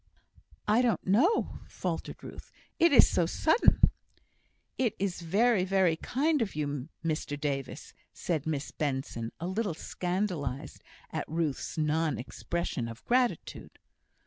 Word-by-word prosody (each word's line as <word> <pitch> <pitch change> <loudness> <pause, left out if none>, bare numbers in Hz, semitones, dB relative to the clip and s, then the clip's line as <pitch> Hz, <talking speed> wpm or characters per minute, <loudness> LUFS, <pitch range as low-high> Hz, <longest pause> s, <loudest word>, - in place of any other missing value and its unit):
"I 215 +3 +4
don't 240 -3 +1
know," 260 - +2
faltered - - -4
Ruth. - - -10 0.3
"It 335 0 +6
is 275 - +8
so 170 - +1
sudden 320 - +3 0.5
" - - -43
"It 245 -5 +1
is 190 -2 -2
very, 200 +4 +3
very 190 -3 +3
kind 290 - 0
of 205 -7 -2
you, 145 -1 -3 0.2
Mr 155 -2 -2
Davis," 140 -2 -3 0.2
said 160 -4 -2
Miss 150 -2 -2
Benson, 130 -5 -3
a 170 - -4
little 190 -1 -1
scandalised 175 -6 -3 0.3
at - - -4
Ruth's 160 -3 -2
non 155 -2 +1
expression 130 +1 -3
of 115 +1 -10
gratitude. 245 0 0
170 Hz, 130 wpm, -30 LUFS, 145-210 Hz, 0.5 s, is